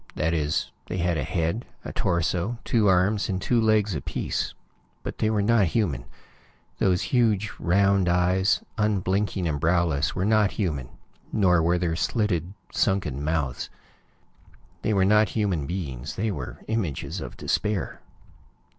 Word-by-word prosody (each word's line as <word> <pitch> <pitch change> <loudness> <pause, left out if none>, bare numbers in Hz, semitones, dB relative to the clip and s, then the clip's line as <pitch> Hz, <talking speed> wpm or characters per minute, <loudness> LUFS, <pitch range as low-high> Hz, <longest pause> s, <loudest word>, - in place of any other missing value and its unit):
That 80 +2 0
is, 75 -1 0 0.2
they 90 - -3
had 85 -1 +1
a 75 - -1
head, 85 - -1 0.2
a - - -5
torso, 90 +6 0
two 110 -3 +2
arms 95 +3 +3
and 95 -1 -1
two 115 +5 +2
legs 110 -2 +3
apiece. 75 - -3 0.5
But - - -6
they 110 - +2
were 105 -2 +1
not 110 -3 +4
human. 85 - -1 0.7
Those 90 -2 +2
huge 110 -4 +2
round 100 +1 +3
eyes, 90 +2 +2 0.2
unblinking 100 -2 0
and 75 -3 -2
browless, 80 -4 +1
were 95 - 0
not 110 -1 +3
human, 75 - -2 0.4
nor 90 -5 +3
were 85 +2 +2
their 85 -2 0
slitted, 95 -2 -1 0.2
sunken 80 -9 0
mouths. 75 -4 -1 1.1
They - - 0
were 95 -1 +4
not 105 +2 +4
human 95 -10 -1
beings; 75 -6 -4
they 110 +2 -1
were 70 -9 -6
images 105 -10 -2
of - - -8
despair. 105 -3 -1
95 Hz, 145 wpm, -25 LUFS, 80-105 Hz, 1.1 s, not